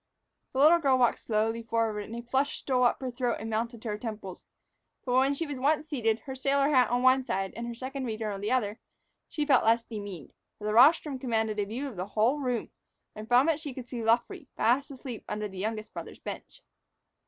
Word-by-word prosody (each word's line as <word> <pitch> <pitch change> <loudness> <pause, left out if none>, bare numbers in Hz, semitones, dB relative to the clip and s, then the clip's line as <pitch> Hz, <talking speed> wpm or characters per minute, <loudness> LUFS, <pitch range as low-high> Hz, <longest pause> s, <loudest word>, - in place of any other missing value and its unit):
The 265 - -1
little 315 +4 +7
girl 270 -5 +3
walked 245 -2 +3
slowly 225 +1 0
forward, 225 -2 -1
and 230 - -8
a 235 - -6
flush 265 +4 0
stole 250 -2 +1
up 240 - +2
her 260 -1 -3
throat 245 -1 -1
and 225 +1 -5
mounted 230 +1 -2
to 230 - -4
her 210 0 -3
temples. 210 -5 -7 0.6
But 250 - -1
when 265 +2 +3
she 330 - -2
was 290 -4 -5
once 300 +3 +1
seated, 225 -7 0
her 265 - -7
sailor 275 +2 +1
hat 260 -4 +4
on 245 +1 +1
one 260 +1 +5
side 195 -5 -2
and 235 +1 -5
her 235 - -5
Second 265 +2 -5
Reader 220 -1 -3
on 200 -1 -5
the 205 - -2
other, 225 -4 0 0.5
she 300 - -2
felt 275 -4 +4
less 230 +1 +3
demeaned; 205 - -8 0.2
for 210 - -9
the 210 - 0
rostrum 275 +3 +5
commanded 220 -4 -1
a 205 - +1
view 240 +8 -4
of 240 -8 -9
the 185 +2 -3
whole 225 +8 +1
room, 250 -4 -2 0.4
and 215 0 -8
from 245 +5 +5
it 320 -2 +2
she 290 -5 -7
could 250 -2 -7
see 245 -2 -5
Luffree, 245 - +1
fast 255 +5 +2
asleep 255 -4 -8
under 210 0 -2
the 190 -2 -9
youngest 215 +1 -4
brother's - - -8
bench. - - -9
240 Hz, 225 wpm, -29 LUFS, 220-265 Hz, 0.6 s, little